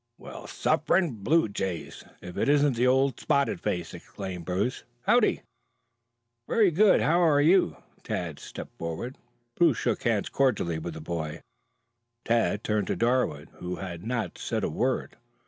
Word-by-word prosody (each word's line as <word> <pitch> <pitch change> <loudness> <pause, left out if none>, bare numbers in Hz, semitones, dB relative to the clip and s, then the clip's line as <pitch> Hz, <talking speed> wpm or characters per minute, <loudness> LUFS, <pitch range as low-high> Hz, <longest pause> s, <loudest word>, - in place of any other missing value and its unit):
"Well, - - -10
suffering 170 -11 +1
blue 160 +7 +3
jays, 95 -4 -4 0.2
if 90 - -9
it - - 0
isn't 145 -4 +3
old 130 +2 +3
Spotted 140 0 +1
Face!" 85 -2 -2
exclaimed 95 -4 -7
Bruce. 95 +8 -1 0.2
"Howdy?" - - +3 1.0
"Very 210 -5 +4
good. 200 +5 +5
How 170 +3 +3
are 155 -4 +4
you?" 155 - +4 0.2
Tad 85 -5 -4
stepped - - -9
forward. 85 +10 -5 0.3
Bruce 160 -3 +3
shook 120 -3 -1
hands 110 -4 0
cordially 105 -12 +1
with 80 0 -6
the 80 - -7
boy. 80 -1 -4 0.8
Tad 115 -2 +1
turned 105 -3 0
to - - 0
Darwood, 115 - 0
who 90 0 -4
had 90 -3 -7
not 115 -1 -3
said - - -2
a - - -1
word. - - -1
110 Hz, 145 wpm, -27 LUFS, 90-140 Hz, 1.0 s, good